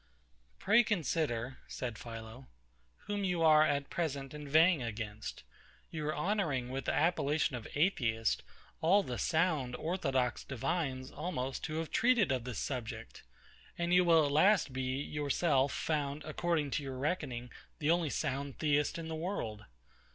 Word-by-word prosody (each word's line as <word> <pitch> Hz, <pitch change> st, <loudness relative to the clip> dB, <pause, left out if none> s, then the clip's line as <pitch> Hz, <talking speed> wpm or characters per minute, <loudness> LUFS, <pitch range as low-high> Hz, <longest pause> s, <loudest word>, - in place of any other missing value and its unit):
Pray 220 Hz, +4 st, +5 dB
consider, 155 Hz, -, -1 dB
said 125 Hz, -3 st, -4 dB
PHILO, 115 Hz, +3 st, -9 dB, 0.6 s
whom 205 Hz, -1 st, -2 dB
you 180 Hz, -3 st, +1 dB
are 155 Hz, -1 st, +7 dB
at 145 Hz, -2 st, +1 dB
present 140 Hz, -5 st, -2 dB
inveighing 155 Hz, +2 st, +3 dB
against. 110 Hz, -2 st, -5 dB, 0.5 s
You 155 Hz, -2 st, -3 dB
are 155 Hz, -, -1 dB
honouring 160 Hz, -12 st, 0 dB
with 135 Hz, +1 st, -4 dB
the -, -, +1 dB
appellation 150 Hz, -4 st, +1 dB
of 115 Hz, -3 st, -6 dB
Atheist 120 Hz, -, +1 dB, 0.4 s
all 195 Hz, +5 st, +5 dB
the 125 Hz, -8 st, -4 dB
sound, 155 Hz, -7 st, +1 dB
orthodox 135 Hz, -8 st, -1 dB
divines, 135 Hz, 0 st, -2 dB
almost, 135 Hz, -7 st, -3 dB
who 155 Hz, -, -4 dB
have 160 Hz, 0 st, -3 dB
treated 235 Hz, -, +3 dB
of 125 Hz, -3 st, -1 dB
this 125 Hz, -5 st, -5 dB
subject; 125 Hz, -5 st, -5 dB, 0.6 s
and 175 Hz, 0 st, 0 dB
you 180 Hz, 0 st, +6 dB
will 165 Hz, -3 st, +5 dB
at 140 Hz, -, -1 dB
last 160 Hz, -1 st, +4 dB
be, 130 Hz, 0 st, -2 dB
yourself, 145 Hz, -1 st, +1 dB
found, 145 Hz, -1 st, -2 dB
according 155 Hz, -1 st, -1 dB
to -, -, 0 dB
your 135 Hz, -1 st, -5 dB
reckoning, 130 Hz, -5 st, -2 dB, 0.3 s
the 150 Hz, +1 st, +1 dB
only 170 Hz, -2 st, +2 dB
sound 140 Hz, 0 st, -2 dB
Theist 150 Hz, 0 st, +1 dB
in 165 Hz, -1 st, -5 dB
the 160 Hz, -, -4 dB
world. 155 Hz, -, -4 dB
145 Hz, 150 wpm, -33 LUFS, 130-165 Hz, 0.6 s, are